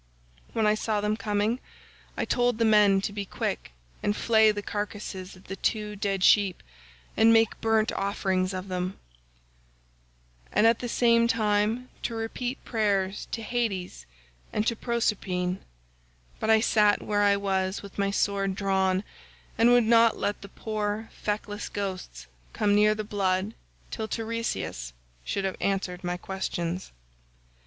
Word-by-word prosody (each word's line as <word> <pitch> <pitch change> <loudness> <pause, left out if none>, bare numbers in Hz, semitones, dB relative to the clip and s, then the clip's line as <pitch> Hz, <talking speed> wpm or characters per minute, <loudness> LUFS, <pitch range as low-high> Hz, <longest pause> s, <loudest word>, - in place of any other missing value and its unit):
When 225 - +1
I 210 - +5
saw 215 0 -1
them 210 +1 0
coming 215 +2 0 0.6
I - - 0
told 245 -2 +1
the 230 - +2
men 210 -3 +5
to 205 - -3
be 205 -1 -3
quick 190 - -4 0.3
and 205 - 0
flay 220 -1 +4
the 205 -1 -5
carcasses 205 -3 -5
of 185 - -17
the 195 - -6
two 210 +1 -1
dead 195 -2 -1
sheep 200 -3 +4 0.5
and 225 +1 +6
make 225 -1 +3
burnt 220 -1 +2
offerings 190 -1 0
of 185 0 -5
them, 185 0 -3 1.5
and 215 - +3
at 230 0 +5
the 245 - -4
same 235 -1 +4
time 220 +2 +1
to 230 - -3
repeat 245 +3 -4
prayers 200 -3 0
to 225 - -3
Hades 195 - -3 0.4
and 210 - 0
to 230 - +1
Proserpine; 195 -6 -1 0.8
but 220 - -2
I 220 0 +6
sat 210 -2 +3
where 205 -1 +1
I 200 0 +4
was 190 -1 -1
with 200 0 -10
my 200 0 +2
sword 200 -1 0
drawn 190 -1 +1 0.5
and 230 +1 +5
would 245 -1 +6
not 230 0 +5
let 205 - -2
the 200 - -10
poor 215 +1 -3
feckless 210 0 -3
ghosts 185 - -5 0.3
come 205 -1 +2
near 210 +1 +4
the 215 - -3
blood 200 0 0 0.4
till 220 -1 -3
Teiresias 225 - -3 0.3
should 195 - -2
have 190 - -2
answered 190 -2 -1
my 175 0 -2
questions. 180 -2 -4
205 Hz, 150 wpm, -27 LUFS, 195-220 Hz, 1.5 s, and